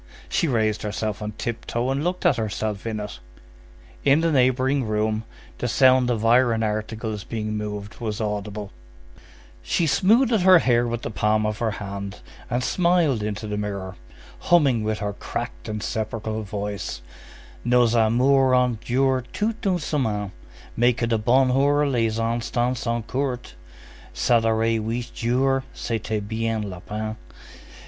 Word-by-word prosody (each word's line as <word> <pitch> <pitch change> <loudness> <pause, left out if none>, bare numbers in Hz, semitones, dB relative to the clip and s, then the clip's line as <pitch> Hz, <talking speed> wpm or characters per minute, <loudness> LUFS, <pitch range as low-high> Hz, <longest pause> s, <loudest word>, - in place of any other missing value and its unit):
She 170 - +1
raised 110 -5 +1
herself 105 0 -3
on 105 0 -4
tiptoe 120 +2 -3
and 140 +2 -1
looked 180 +1 -2
at 130 - +4
herself 110 -1 -3
in 110 -1 -2
it. 105 0 -6 0.8
In 140 +3 +4
the 165 0 +2
neighboring 130 0 +2
room, 110 0 -1 0.3
the 125 - -1
sound 130 +1 +4
of 115 -2 0
iron 115 -1 +4
articles 110 0 -3
being 110 -2 -4
moved 105 -1 -5
was 110 -2 -3
audible. 105 -1 -4 0.9
She 170 - 0
smoothed 220 - +3
her 185 0 +8
hair 120 -6 +2
with 120 0 -3
the - - -4
palm 110 +1 +1
of 105 0 -2
her 115 - +1
hand, 100 -1 -6 0.3
and 125 +1 0
smiled 170 - +2
into 105 +1 -3
the 105 -1 -3
mirror, 100 -2 -4 0.4
humming 140 -10 +3
with 110 0 -1
her 105 -1 -3
cracked - - -6
and 105 -1 -4
sepulchral 110 0 -3
voice:— 100 - -5 0.6
Nos 120 -1 +3
amours 130 +4 +4
ont 125 -3 +1
duré 130 +1 +1
toute 210 +4 -2
une 185 -2 +2
semaine, 110 - -1 0.4
Mais 120 +1 +3
que 115 - -1
du 115 -1 +1
bonheur 135 +5 +3
les 115 -4 0
instants 120 +2 0
sont 115 -1 -2
courts! 130 -1 -3 0.6
S'adorer 115 - +2
huit 120 +2 -3
jours, 135 +3 +1
c'était 110 -2 -3
bien 115 0 -1
la 95 -3 -6
peine! 110 +3 -5
115 Hz, 145 wpm, -24 LUFS, 105-130 Hz, 0.9 s, her